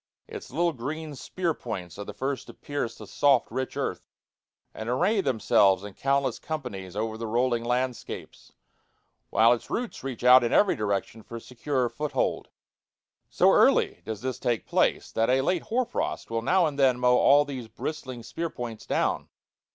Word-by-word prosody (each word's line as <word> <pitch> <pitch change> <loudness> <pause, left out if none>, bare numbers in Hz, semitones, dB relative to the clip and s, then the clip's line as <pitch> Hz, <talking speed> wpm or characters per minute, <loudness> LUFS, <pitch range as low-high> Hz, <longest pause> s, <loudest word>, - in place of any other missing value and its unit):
Its - - -8
little 170 +5 +1
green 150 +5 -5
spear 170 +5 -2
points 90 - -7
are - - -3
the - - -7
first 135 -1 -3
to - - -11
pierce 145 -5 -4
the - - -9
soft 140 -4 +2
rich 130 0 -3
earth, - - -3 0.6
and 110 +1 -6
array 200 - +2
themselves 100 - +3
in 105 -1 -8
countless 140 +3 0
companies 105 - -6
over 110 +1 -3
the 115 - -4
rolling 120 +1 +1
landscapes, 125 +1 -4 0.8
while 115 +3 +5
its 120 - -5
roots 240 0 -4
reach 130 -4 -5
out 125 0 +8
in 120 - 0
every 205 - +4
direction 105 +1 -2
for 115 +2 -8
securer 125 +2 -2
foothold. 150 +4 -2 0.8
So - - +4
early - - +4
does 110 -2 -5
this 130 -1 -3
take 120 -3 -1
place, - - +1
that 115 +1 +1
a 130 +1 +3
late 175 +5 0
hoar 250 +2 0
frost 240 - -3
will 115 0 0
now 180 +9 +3
and 145 -2 -3
then 130 -2 +4
mow 125 0 +4
all 145 +1 +5
these 130 -5 -6
bristling 130 +1 -6
spear 165 +8 -4
points 115 -6 -7
down. - - 0
125 Hz, 175 wpm, -27 LUFS, 115-145 Hz, 0.8 s, out